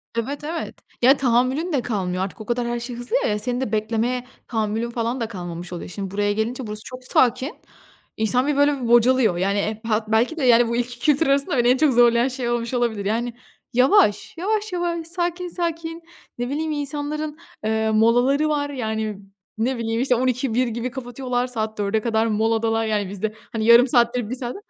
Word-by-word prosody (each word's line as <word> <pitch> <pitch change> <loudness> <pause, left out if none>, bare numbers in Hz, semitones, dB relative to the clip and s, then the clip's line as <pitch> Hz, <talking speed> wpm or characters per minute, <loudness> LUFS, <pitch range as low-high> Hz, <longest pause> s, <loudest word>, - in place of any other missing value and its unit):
Evet, 275 +6 -3
evet, 325 +2 -4 0.3
ya 265 +4 +6
tahammülün 260 +7 +1
de 265 - +2
kalmıyor 185 -5 -2
artık, 200 +3 -6
o - - -8
kadar 240 0 -1
her 240 0 -2
şey 240 0 -6
hızlı 245 - -3
ya, - - +1
ya 210 0 0
senin 245 +3 -2
de 245 -5 -2
beklemeye 230 +3 -1 0.2
tahammülün 220 0 -1
falan 235 +2 -2
da 225 - -1
kalmamış 175 -2 -7
oluyor. 175 - -6
Şimdi 195 0 -5
buraya 205 +1 0
gelince, 230 +3 -2
burası 210 0 -5
çok 255 0 -9
sakin, 260 +2 +2 0.6
insan 245 +5 +1
bir 295 - +1
böyle 285 -2 +3
bir 235 - -2
bocalıyor, 240 -5 +4
yani, 200 +2 +1
e 215 +1 -2
pa 220 -1 0
belki 230 +9 +1
de, 295 - -2
yani 240 -1 +6
bu 235 - -1
iki 245 0 -3
kültür 300 +2 +2
arasında, 275 0 +2
beni 240 0 +3
en 255 +1 +5
çok 300 -2 +3
zorlayan 240 +1 +5
şey 255 -2 -3
olmuş 235 +1 -2
olabilir 230 -5 0
yani, 235 +3 -1 0.4
yavaş. 250 - +3
Yavaş 420 +2 -1
yavaş, 340 -2 -2
sakin 350 +1 -2
sakin 335 -1 -3 0.4
ne 245 0 -3
bileyim 310 +3 -2
insanların, 295 +1 -3 0.3
ııı, 220 0 +1
molaları 245 +7 +3
var 290 -1 0
yani 220 -6 -3 0.4
ne 250 +3 0
bileyim 230 0 -1
işte, 255 -2 +2
12.00-13.00 250 0 +1
gibi 235 +2 -3
kapatıyorlar, 250 -1 -3
saat 220 -3 -4
16.00´e 210 +1 0
kadar 225 -1 +1
moladalar 225 +1 +1
yani 205 -3 -1
bizde, 205 +2 -3 0.2
hani, 220 -1 -2
yarım 235 +3 +7
saat 240 0 +3
1 245 0 -2
saat 245 -1 -5
240 Hz, 195 wpm, -22 LUFS, 220-270 Hz, 0.6 s, yarım